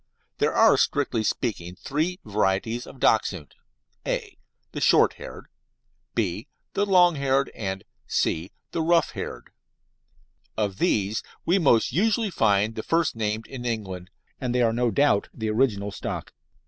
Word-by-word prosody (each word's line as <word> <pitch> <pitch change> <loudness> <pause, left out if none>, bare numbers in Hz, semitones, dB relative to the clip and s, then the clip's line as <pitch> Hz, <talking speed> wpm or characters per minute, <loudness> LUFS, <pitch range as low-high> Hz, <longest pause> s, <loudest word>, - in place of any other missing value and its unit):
There - - +2
are, - - +6
strictly 130 -5 +1
speaking, 95 -7 -2
three 160 - -2
varieties 105 +3 0
of 130 - -12
Dachshund 95 - +1 0.5
(a) - - -3 0.4
the - - -5
short - - +5
haired, - - -10 0.7
(b) 105 - -1 0.3
the 205 - +1
long 180 -4 +5
haired, 135 0 +1
and 95 -2 -4 0.2
(c) 85 +4 0 0.2
the 165 - -1
rough 170 +1 +3
haired. - - -7 1.1
Of 100 -3 -1
these 105 +1 +1 0.2
we 180 +4 +3
most 130 -9 +3
usually 215 - +1
find 105 - +2
the 110 - -4
first 165 +3 +1
named 110 0 -2
in 130 -2 -8
England, 95 -6 -4 0.3
and 125 -1 -2
they 125 - +3
are 115 -1 +2
no 120 +1 +1
doubt 115 -5 +2
the 110 -1 -2
original 105 -4 +1
stock. - - -5
115 Hz, 145 wpm, -25 LUFS, 100-140 Hz, 1.1 s, are